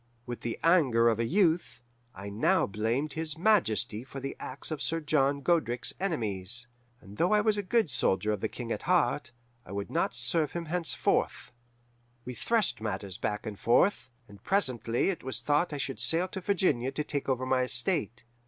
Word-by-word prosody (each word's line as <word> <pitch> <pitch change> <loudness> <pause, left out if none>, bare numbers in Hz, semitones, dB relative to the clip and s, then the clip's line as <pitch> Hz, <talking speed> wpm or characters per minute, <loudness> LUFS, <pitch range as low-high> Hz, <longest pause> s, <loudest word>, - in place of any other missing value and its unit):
With 120 -1 -6
the 115 - -3
anger 135 -9 +4
of 115 -1 0
a 115 - +1
youth, 175 - +1 0.3
I 95 +2 -8
now 105 +3 +2
blamed 115 +8 -1
his 160 -1 -3
Majesty 120 - +2
for 135 +1 -8
the 135 +1 -5
acts 135 +4 -6
of 155 -2 -3
Sir 165 - 0
John 140 -2 +1
Godric's 130 -7 +1
enemies. 115 - -2 0.4
And 100 +3 -13
though 180 +5 +2
I 210 - +5
was 215 -1 +3
a 205 - -1
good 215 +2 +2
soldier 105 -5 +1
of 105 -2 -2
the - - 0
King 120 -2 -6
at - - -2
heart, 165 -7 +2 0.3
I 90 - -13
would 100 0 -4
not - - 0
serve 140 +6 0
him 170 -1 -3
henceforth. 170 +1 0 0.7
We 125 - -5
threshed 200 - 0
matters 100 -3 -4
back 105 +2 -2
and 105 -3 -6
forth, 130 - +3 0.2
and 100 -2 -15
presently 125 - +1
it 180 - -7
was 130 0 -1
thought 150 +4 +1
I 145 - -3
should 135 -1 -4
sail 170 +3 0
to 190 0 -6
Virginia 160 -10 +1
to 150 +2 -2
take 145 -2 -3
over 130 -1 0
my 130 0 +2
estate. 120 - 0
135 Hz, 190 wpm, -29 LUFS, 115-165 Hz, 0.7 s, I